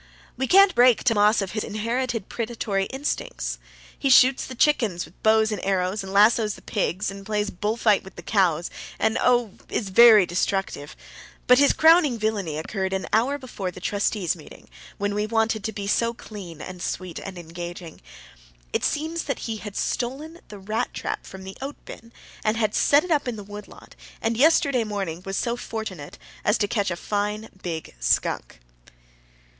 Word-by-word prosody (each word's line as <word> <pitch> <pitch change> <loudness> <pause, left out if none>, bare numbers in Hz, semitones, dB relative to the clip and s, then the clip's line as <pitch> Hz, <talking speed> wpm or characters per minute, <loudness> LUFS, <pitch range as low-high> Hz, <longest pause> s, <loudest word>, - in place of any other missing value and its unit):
We 265 - -2
can't 390 +2 +6
break 245 -1 +5
Tammas 210 -2 +3
of 190 - -6
his 215 - -2
inherited 230 +1 -2
predatory 220 -4 -2
instincts. 270 +5 -4 0.4
He 275 - +1
shoots 260 0 +6
the 260 - -8
chickens 230 - +2
with 175 - -21
bows 220 0 +4
and 210 - -4
arrows 190 +1 0
and 190 0 -7
lassoes 210 +1 +4
the - - -16
pigs 200 -2 -1
and 195 0 -9
plays 210 0 -1
bull 210 +5 -2
fight 215 -4 +3
with 190 -1 -13
the 175 - -10
cows 175 -4 +1 0.3
and 220 0 +1
oh, 245 -4 +3 0.2
is 205 - -2
very 215 -1 +8
destructive! 175 -4 -2 0.5
But 250 +1 +6
his 285 - +6
crowning 320 -6 +5
villainy 205 -8 -2
occurred 190 +4 -3
an 190 -1 -2
hour 250 +6 +2
before 240 -8 -5
the 180 - -10
trustees' 200 -2 -1
meeting, 155 - -14 0.3
when 205 0 -1
we 210 +1 -1
wanted 225 -1 0
to 220 - -1
be 205 -2 -6
so 230 +3 +1
clean 185 -9 -9
and 185 -1 -8
sweet 180 -2 -4
and 190 -2 -8
engaging. 175 0 -8 0.7
It - - 0
seems 320 +2 -1
that 275 - -3
he 225 -2 -3
had 210 -1 -8
stolen 295 +7 -3
the 210 - -10
rat 215 +3 -3
trap - - -4
from 190 0 -10
the 190 0 -8
oat 275 +2 -5
bin, 230 +1 -11 0.3
and 215 +1 +1
had 215 -2 0
set 285 +1 +4
it 360 - -6
up 290 -4 +2
in 245 - -2
the 205 - -8
wood 205 +1 -9
lot, - - -16 0.2
and 225 +1 -1
yesterday 280 -2 +4
morning 195 -6 -4
was 195 0 -3
so 235 0 0
fortunate 220 -11 -6 0.3
as 210 - +3
to 205 - 0
catch 205 -2 0
a 175 - -2
fine 210 +3 -3
big 165 -3 -5
skunk. - - 0
210 Hz, 180 wpm, -24 LUFS, 190-240 Hz, 0.7 s, very